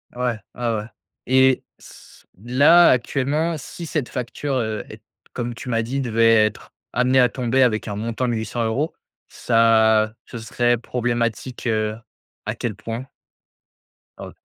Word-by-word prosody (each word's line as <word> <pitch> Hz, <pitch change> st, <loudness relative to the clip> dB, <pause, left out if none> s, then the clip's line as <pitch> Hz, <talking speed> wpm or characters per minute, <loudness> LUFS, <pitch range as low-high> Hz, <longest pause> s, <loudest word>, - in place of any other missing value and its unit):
Ouais, 120 Hz, -3 st, -1 dB, 0.2 s
ouais, 120 Hz, -2 st, -1 dB
ouais 105 Hz, 0 st, -3 dB, 0.4 s
et 130 Hz, 0 st, +4 dB, 0.2 s
s -, -, -16 dB, 0.2 s
là 145 Hz, +9 st, +6 dB
actuellement, 140 Hz, +6 st, 0 dB
si 170 Hz, +5 st, -8 dB
cette 150 Hz, -5 st, -2 dB
facture, 130 Hz, +3 st, -4 dB
heu, 110 Hz, -3 st, -2 dB
est 110 Hz, 0 st, -11 dB, 0.3 s
comme 120 Hz, -1 st, -3 dB
tu 125 Hz, -, -10 dB
m'as 115 Hz, -2 st, +1 dB
dit 130 Hz, +5 st, -3 dB
devait 115 Hz, -3 st, +4 dB
être 105 Hz, -, -5 dB, 0.2 s
amenée 130 Hz, +1 st, +3 dB
à 125 Hz, -, +6 dB
tomber, 130 Hz, +1 st, 0 dB
avec 110 Hz, -2 st, +1 dB
un 100 Hz, -, -4 dB
montant 115 Hz, +3 st, -2 dB
de -, -, 0 dB
800€, 115 Hz, +6 st, -2 dB, 0.3 s
ça 110 Hz, -2 st, +3 dB
ce 115 Hz, -, -9 dB
serait 120 Hz, +2 st, 0 dB
problématique, 120 Hz, 0 st, -2 dB
heu, 110 Hz, -1 st, 0 dB, 0.5 s
à -, -, -3 dB
quel -, -, -3 dB
point? 115 Hz, +4 st, -6 dB, 1.1 s
O -, -, -8 dB
120 Hz, 145 wpm, -22 LUFS, 110-130 Hz, 1.1 s, là